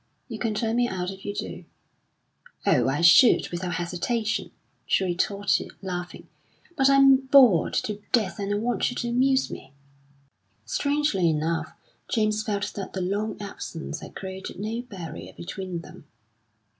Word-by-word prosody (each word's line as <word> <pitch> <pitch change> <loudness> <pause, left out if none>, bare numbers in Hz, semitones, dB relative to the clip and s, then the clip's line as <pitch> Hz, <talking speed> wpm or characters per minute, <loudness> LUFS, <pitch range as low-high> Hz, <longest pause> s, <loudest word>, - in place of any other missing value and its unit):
"You 225 -4 -7
can 225 -3 -1
turn 225 +2 0
me 245 0 +3
out 180 0 -3
if 195 0 -11
you 205 - -3
do." - - -6 1.0
"Oh, - - +3
I 145 +5 -1
should 170 +9 +7
without 175 0 -3
hesitation," 195 +6 -2 0.4
she - - +2
retorted, 195 +2 0
laughing; 180 -2 -5 0.5
"but 270 -3 +4
I'm 275 -1 +7
bored 255 - +6
to 210 -1 -5
death, 220 -4 +1
and 200 0 -2
I 205 - +1
want 235 +3 0
you 245 - -6
to 240 - -2
amuse 265 +2 +2
me." - - -9 0.9
Strangely 285 - +1
enough, 160 +1 -1 0.4
James 215 -2 +1
felt 205 -2 -2
that 195 - -6
the 190 - -3
long 205 +4 -2
absence 195 -5 -6
had - - -11
created 190 -1 -7
no 220 +3 -3
barrier 185 -10 -9
between 180 -1 -6
them. - - -14
205 Hz, 150 wpm, -25 LUFS, 180-235 Hz, 1.0 s, should